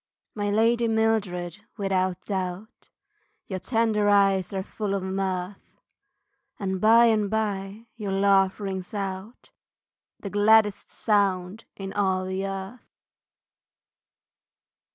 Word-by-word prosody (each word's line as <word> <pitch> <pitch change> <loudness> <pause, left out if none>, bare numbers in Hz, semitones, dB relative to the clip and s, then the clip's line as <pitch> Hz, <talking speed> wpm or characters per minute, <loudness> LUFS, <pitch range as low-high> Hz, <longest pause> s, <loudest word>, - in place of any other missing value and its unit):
My 205 -1 -2
lady 230 +3 +2
Mildred 215 -6 0 0.2
without 185 -2 0
doubt, 190 +2 -5 0.6
Your 190 -1 -5
tender 220 -2 +1
eyes 195 -2 +3
are 190 -1 -3
full 205 0 -3
of 195 - -3
mirth, 190 0 -4 0.8
And 190 -2 -3
by 230 +2 +6
and 215 -3 +2
by, 210 0 -3
your 205 -3 -4
laugh 195 0 +3
rings 190 -1 -5
out, 195 +3 -6 0.7
The 200 - -7
gladdest 210 0 +3
sound 200 -1 0
in 195 -1 -7
all 190 -2 0
the 190 +1 -3
earth. 195 +5 -8
200 Hz, 110 wpm, -25 LUFS, 190-215 Hz, 0.8 s, by